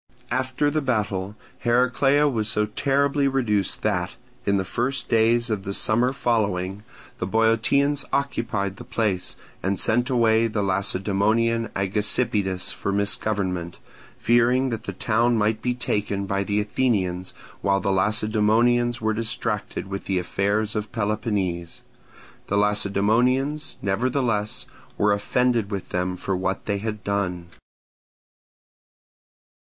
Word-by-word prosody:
After 130 +3 0
the 155 +1 0
battle, 105 -6 -1 0.2
Heraclea 125 +4 +3
was 110 -6 -1
so 105 - +1
terribly 140 +5 +1
reduced 110 -8 0
that 95 -2 -1 0.3
in 100 0 +3
the 95 - -1
first 125 +7 -2
days 115 +1 +3
of 105 -3 -1
the 100 0 -4
summer 120 +4 +2
following 105 -7 -1 0.4
the 90 - -2
Boeotians 125 +7 +2
occupied 110 -8 -1
the - - -9
place 100 -5 -1 0.3
and 95 -1 -1
sent 120 +3 +3
away 115 -2 +3
the 105 -2 -2
Lacedaemonian 105 +4 +1
Agesippidas 100 -1 0
for 100 - -3
misgovernment, 100 -3 -1 0.4
fearing 125 +3 +3
that 115 - -4
the - - -3
town 115 +4 +1
might 110 +1 +1
be 125 -1 -1
taken 105 -4 -2
by 100 0 -1
the 100 +1 0
Athenians 100 -5 -1 0.3
while 100 0 +2
the 100 0 0
Lacedaemonians 110 +4 +2
were 110 0 +1
distracted 115 0 -2
with 100 0 -6
the 95 - 0
affairs 100 +4 -1
of 105 0 -3
Peloponnese. 100 -6 -2 0.6
The 100 - 0
Lacedaemonians, 110 +8 +1
nevertheless, 110 +1 0 0.3
were 105 0 +3
offended 115 +1 +1
with 100 -3 -5
them 90 0 -2
for 95 +1 -2
what 95 +1 -2
they 100 -1 -1
had 105 -1 -4
done. 90 -4 -2
105 Hz, 125 wpm, -24 LUFS, 100-120 Hz, 0.6 s, Heraclea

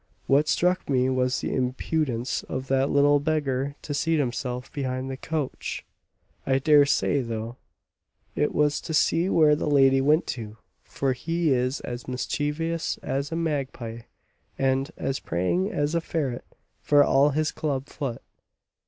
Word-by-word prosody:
What 145 +3 +3
struck 180 +4 +1
me 130 -1 +2
was 130 0 0
the - - -2
impudence 130 -1 -1
of 130 0 -4
that 135 +1 +2
little 145 +1 +4
beggar 140 -2 -1
to 145 - -4
seat 165 +3 +1
himself 125 -2 -3
behind 130 -1 -3
the - - -4
coach. 150 0 -4 0.6
I 135 -1 +2
dare 145 +1 +5
say, 140 0 +2
though, 115 0 -5 0.8
it 150 - +1
was 150 -1 +1
to 160 - -3
see 170 +4 +2
where 155 -4 +5
the 150 - -2
lady 135 -2 +5
went 150 +4 +3
to, 110 -3 -8 0.3
for 135 -1 -1
he 165 +2 0
is 125 +2 0
as 120 0 -6
mischievous 150 +6 -2
as 140 +2 -2
a - - -2
magpie, 135 -8 -3 0.6
and 135 +1 +1
as 135 - -2
prying 175 - -1
as 145 -5 -1
a 170 - +1
ferret, 140 -7 -3 0.4
for 145 -1 +5
all 140 +1 +4
his 155 +1 0
club 140 -3 -2
foot." 140 -5 -5
140 Hz, 155 wpm, -26 LUFS, 130-150 Hz, 0.8 s, dare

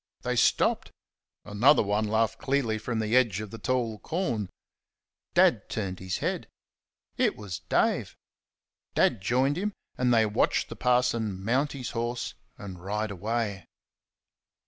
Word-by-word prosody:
They - - -1
stopped. - - +2 0.6
Another 110 +8 +4
one 105 +1 0
laughed 110 +1 +1
clearly 130 -6 0
from 115 +1 -3
the 110 +1 0
edge 115 -7 +3
of 105 -2 -6
the 115 - -8
tall 115 -2 -1
corn. 120 - -2 0.9
Dad - - +4
turned 95 -4 -3
his 95 0 -3
head. - - -2 0.7
It - - +2
was 100 -6 -6
Dave. - - +1 0.8
Dad 115 - +3
joined 130 - +1
him, 205 +2 -2 0.3
and 125 -1 +3
they 115 -2 +5
watched 105 - +1
the - - -7
parson 115 -6 +1
mount 135 +6 +1
his 130 -3 -5
horse 120 +1 -3 0.2
and 90 -3 -9
ride 105 +2 -2
away. 105 0 -2
110 Hz, 140 wpm, -28 LUFS, 105-125 Hz, 0.9 s, they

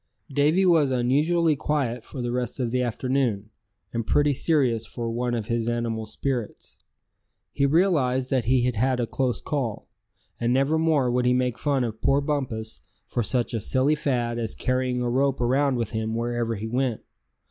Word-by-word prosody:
Davy 150 +7 +3
was 165 -6 +4
unusually 150 +6 +2
quiet 135 -6 -1
for 130 -1 -7
the 120 - -2
rest 125 +1 -3
of 120 -3 -1
the 125 +1 +1
afternoon, 120 -3 -1 0.4
and 115 -1 -2
pretty 145 0 +3
serious 130 -6 +1
for 115 +1 -5
one 120 +1 -1
of 115 -3 -3
his 115 +1 -1
animal 115 -2 -2
spirits. 125 0 -4 0.7
He 140 - +1
realized 140 -6 +2
that 130 -3 +1
he 125 +1 +3
had 125 0 +1
had 125 +3 +1
a 120 - +1
close 125 +1 -1
call; 130 -8 -3 0.5
and 120 0 +1
never 135 +5 +2
more 150 -6 +2
would 125 0 +1
he 125 - +4
make 125 -1 0
fun 140 -3 +1
of 110 -2 -4
poor 140 +1 +3
Bumpus 130 -7 -3 0.2
for 120 - -2
such 120 +2 -1
a 115 - 0
silly 130 +7 +2
fad 120 -5 -1
as 115 -2 -3
carrying 125 -1 -1
a - - 0
rope 135 +2 +1
around 130 +3 +2
with 115 -3 -2
him 110 0 -2
wherever 120 0 -1
he 105 +1 -5
went. 125 -1 -1
125 Hz, 180 wpm, -25 LUFS, 120-140 Hz, 0.7 s, was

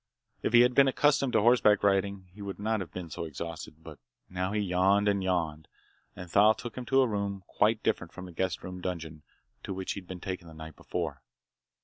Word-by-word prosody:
If - - -1
he 120 - +8
had 125 +1 +4
been 135 +1 +6
accustomed 140 -1 +2
to 110 - +4
horseback 110 -3 +4
riding, 100 -1 +1
he 105 - -12
wouldn't 100 +1 -5
have 105 -6 -1
been 90 -3 -7
so - - -4
exhausted. 80 0 -7
But 80 -2 -11 0.3
now 90 +1 -2
he 105 - 0
yawned, 100 +1 +2
and 100 -2 +1
yawned, 80 -4 -1 0.5
and 90 0 -8
Thal 105 +5 +5
took 120 +2 -8
him 125 - -6
to 135 0 +4
a 130 - +3
room 100 -3 -3
quite 110 +3 +1
different 90 - -1
from 95 - -9
the 90 - -10
guest 90 +2 -2
room 90 0 -7
dungeon 80 -4 -5 0.4
to 95 - -5
which 95 0 -3
he'd 95 -3 -6
been 90 -1 -7
taken 90 -2 -5
the 80 - -12
night 80 -1 -9
before. 80 -7 -4
95 Hz, 215 wpm, -29 LUFS, 85-105 Hz, 0.5 s, he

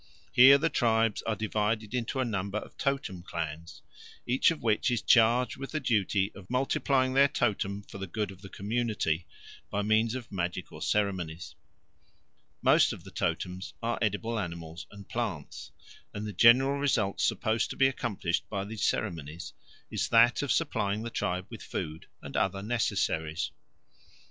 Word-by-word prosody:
Here 135 +3 +9
the 155 +4 +1
tribes 115 -4 +2
are 110 - +1
divided 110 +1 -1
into 125 +1 -2
a 130 - +2
number 100 -2 -2
of - - -7
totem 135 -10 -2
clans, 85 -1 -6 0.4
each 125 +2 +3
of 165 -2 -4
which 110 +2 +2
is 120 -3 -1
charged 120 +1 +4
with 135 +2 -7
the 155 - 0
duty 105 -6 +1
of 95 -2 -13
multiplying 130 +1 +1
their 140 +1 +6
totem 100 -7 -1
for 100 - -10
the 95 - -4
good 105 +3 -3
of 95 0 -14
the 100 - -10
community 105 -6 -1 0.4
by 100 0 -1
means 110 +3 +2
of 125 -4 -7
magical 90 -1 -4
ceremonies. 85 -7 -1 1.1
Most - - +5
of - - -10
the - - -12
totems 90 +1 -3
are 115 0 -1
edible 110 +2 -1
animals 85 -4 -6
and 100 -1 -12
plants, 105 -12 -4 0.5
and 105 - -4
the 105 - -5
general 130 +7 +5
result 110 -9 +1
supposed 110 0 +1
to - - -5
be 135 - +4
accomplished 105 -9 -2
by 100 -2 -3
these 110 0 -5
ceremonies 80 0 -2 0.4
is - - -1
that 120 +1 +5
of 145 - -1
supplying 105 -9 0
the 115 - -5
tribe 90 -2 -2
with - - -8
food 80 +1 -5 0.2
and - - -8
other 95 0 0
necessaries. 100 -8 -1
105 Hz, 160 wpm, -29 LUFS, 95-120 Hz, 1.1 s, Here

